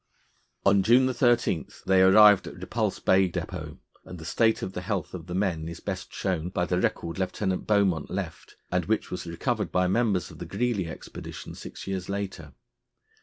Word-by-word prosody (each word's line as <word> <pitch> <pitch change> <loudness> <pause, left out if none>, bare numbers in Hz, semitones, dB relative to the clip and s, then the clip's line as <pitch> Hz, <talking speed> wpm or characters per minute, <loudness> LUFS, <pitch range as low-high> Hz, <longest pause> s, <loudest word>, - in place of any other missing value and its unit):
On 100 0 +5
June 125 +5 +4
13 120 - +2 0.2
they 95 -1 +4
arrived 100 +1 +7
at - - -8
Repulse - - -2
Bay 95 0 +3
depôt, - - -5 0.3
and 90 - -9
the 80 - -10
state 110 +7 +2
of 95 - -4
the 90 - -4
health 95 -2 -3
of 85 -2 -7
the 90 - -4
men 90 -5 -1
is 85 0 -7
best 95 -2 -5
shown 90 -3 -2
by 90 -1 -1
the 90 0 0
record 85 +1 -2
Lieutenant 95 0 -2
Beaumont 100 -7 +2
left, - - -6 0.2
and 90 -2 +1
which 110 0 -1
was 90 - -5
recovered 100 - -2
by 90 +2 +2
members 100 -2 +1
of - - -13
the - - -6
Greely 120 -8 -1
expedition - - -8
six - - -9
years 95 -1 -4
later. 100 -1 -5
95 Hz, 180 wpm, -27 LUFS, 90-105 Hz, 0.3 s, arrived